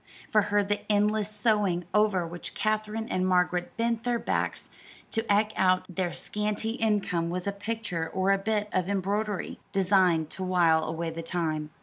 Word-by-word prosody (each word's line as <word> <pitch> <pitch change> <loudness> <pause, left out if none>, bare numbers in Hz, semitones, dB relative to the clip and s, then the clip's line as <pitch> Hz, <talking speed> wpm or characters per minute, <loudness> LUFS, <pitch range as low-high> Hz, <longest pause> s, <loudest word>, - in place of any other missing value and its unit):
For 215 - +5
her 205 0 +3
the 205 +1 -1
endless 210 0 +2
sewing 210 -4 +1
over 210 -4 +3
which 170 +1 -6
Katherine 215 +1 -1
and 185 - 0
Margaret 180 -1 +1
bent 230 0 0
their 245 -1 +1
backs - - -2 0.4
to 225 - +1
eke 210 +1 +3
out 185 -1 +3
their 180 -1 -2
scanty 210 +3 -2
income 205 -7 0
was 180 +1 -3
a 200 - 0
picture 200 -5 -3
or 190 +2 +1
a 195 - +3
bit 210 +1 0
of 185 0 0
embroidery, 200 +1 -2
designed 185 -5 +3
to 190 - -4
while 170 -3 +3
away 165 +1 -3
the 165 +1 -5
time. 160 -3 -2
195 Hz, 165 wpm, -28 LUFS, 175-210 Hz, 0.4 s, For